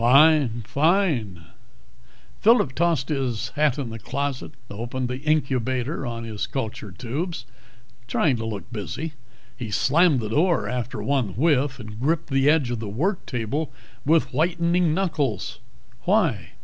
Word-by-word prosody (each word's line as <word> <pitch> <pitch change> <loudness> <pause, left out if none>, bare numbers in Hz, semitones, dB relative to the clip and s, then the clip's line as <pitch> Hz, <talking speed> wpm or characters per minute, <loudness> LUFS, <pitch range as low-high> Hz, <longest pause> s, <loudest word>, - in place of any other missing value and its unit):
"Fine, 135 -2 +5
fine." 140 - +1 1.0
Phillip 220 - +4
tossed 160 -3 +1
his 130 -7 -1
hat 150 -2 +1
in 130 -5 -4
the 115 - -6
closet, 135 +4 -3
opened 120 +4 -4
the 125 +1 -3
incubator 135 -2 0
on 115 -1 -4
his 110 -2 -4
culture 110 -5 -4
tubes, 135 - -4 0.6
trying 130 +3 +2
to 115 - -4
look 110 +2 -6
busy. 145 +9 -4 0.4
He 120 -3 -6
slammed 150 - +3
the 110 - -4
door 155 - +2
after 125 +1 -3
one 130 -9 0
whiff 140 -2 +2
and 110 -2 -8
gripped 155 +4 0
the 135 +1 +4
edge 145 -6 +3
of 120 - -2
the 110 -2 -5
work 170 - -1
table 130 +6 -2 0.3
with 160 0 +2
whitening 170 +2 +2
knuckles. 140 - -1 0.5
"Why?" 175 - +1
135 Hz, 140 wpm, -24 LUFS, 115-160 Hz, 1.0 s, Fine